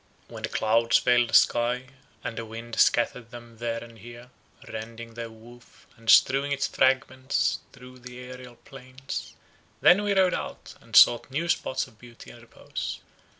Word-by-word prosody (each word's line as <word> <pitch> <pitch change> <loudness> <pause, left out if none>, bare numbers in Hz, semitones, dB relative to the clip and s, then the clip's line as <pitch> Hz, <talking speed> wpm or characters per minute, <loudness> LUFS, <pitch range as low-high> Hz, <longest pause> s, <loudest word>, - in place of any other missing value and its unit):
When - - -10
the - - -3
clouds 115 +2 +2
veiled 120 -1 +2
the - - 0
sky, 125 +2 +3 0.3
and - - -5
the 115 - -5
wind 115 +1 -8
scattered 120 0 +2
them 115 -1 -13
there 115 -1 -3
and 115 -1 -14
here, 120 +2 -12 0.4
rending 115 +1 -8
their 115 0 -6
woof, 120 +2 -17
and 115 -1 -8
strewing 140 +2 +5
its 140 0 0
fragments 130 +1 0
through 130 -1 -14
the 125 0 -11
aerial 125 -1 -10
plains—then 135 - -2
we 205 -1 0
rode 185 -2 +3
out, - - -6
and - - -10
sought 120 +4 +6
new 155 +6 -2
spots 130 - -1
of 110 - -21
beauty 120 -1 -14
and 120 - -15
repose. 120 - -7
120 Hz, 160 wpm, -26 LUFS, 115-130 Hz, 0.4 s, sought